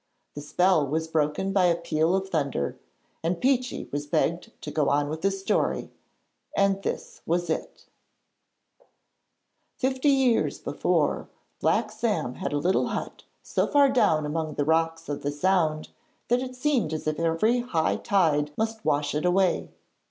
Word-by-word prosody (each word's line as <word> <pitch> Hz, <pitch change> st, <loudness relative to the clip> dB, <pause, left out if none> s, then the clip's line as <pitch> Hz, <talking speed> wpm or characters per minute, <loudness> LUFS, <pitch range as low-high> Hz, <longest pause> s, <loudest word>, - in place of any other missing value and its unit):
The 145 Hz, -, -7 dB
spell 160 Hz, 0 st, +2 dB
was 160 Hz, +3 st, -1 dB
broken 160 Hz, +4 st, 0 dB
by 190 Hz, -2 st, +4 dB
a 170 Hz, -1 st, +4 dB
peal 165 Hz, +1 st, +1 dB
of 190 Hz, 0 st, -1 dB
thunder, 140 Hz, -, -1 dB, 0.5 s
and 170 Hz, +1 st, 0 dB
Peechy 255 Hz, -1 st, 0 dB
was 145 Hz, +1 st, -3 dB
begged 170 Hz, +8 st, 0 dB
to -, -, -5 dB
go 150 Hz, -3 st, +1 dB
on 145 Hz, 0 st, +1 dB
with 155 Hz, +1 st, -4 dB
his 195 Hz, 0 st, 0 dB
story, 190 Hz, -, 0 dB, 0.7 s
and 195 Hz, 0 st, +2 dB
this -, -, -5 dB
was 175 Hz, 0 st, 0 dB
it: -, -, -5 dB, 1.9 s
Fifty 260 Hz, +2 st, +1 dB
years 265 Hz, -4 st, +2 dB
before, -, -, 0 dB, 0.3 s
Black 215 Hz, -2 st, +1 dB
Sam 210 Hz, -, -1 dB
had -, -, -4 dB
a 145 Hz, -, 0 dB
little 180 Hz, +6 st, +1 dB
hut -, -, -5 dB, 0.2 s
so -, -, 0 dB
far 285 Hz, -2 st, +5 dB
down 160 Hz, -, +3 dB
among 155 Hz, 0 st, -3 dB
the 145 Hz, -, 0 dB
rocks 165 Hz, +1 st, +1 dB
of 145 Hz, -, -4 dB
the 145 Hz, -, -1 dB
Sound 155 Hz, -1 st, +1 dB, 0.4 s
that 245 Hz, +1 st, +3 dB
it 255 Hz, -1 st, -6 dB
seemed 250 Hz, -, 0 dB
as 155 Hz, -, -4 dB
if 155 Hz, 0 st, -1 dB
every 165 Hz, +9 st, +2 dB
high 175 Hz, -10 st, 0 dB
tide 160 Hz, -8 st, +2 dB
must 220 Hz, 0 st, -2 dB
wash 145 Hz, 0 st, 0 dB
it 150 Hz, -, -1 dB
away. 180 Hz, 0 st, +2 dB
170 Hz, 160 wpm, -26 LUFS, 155-215 Hz, 1.9 s, far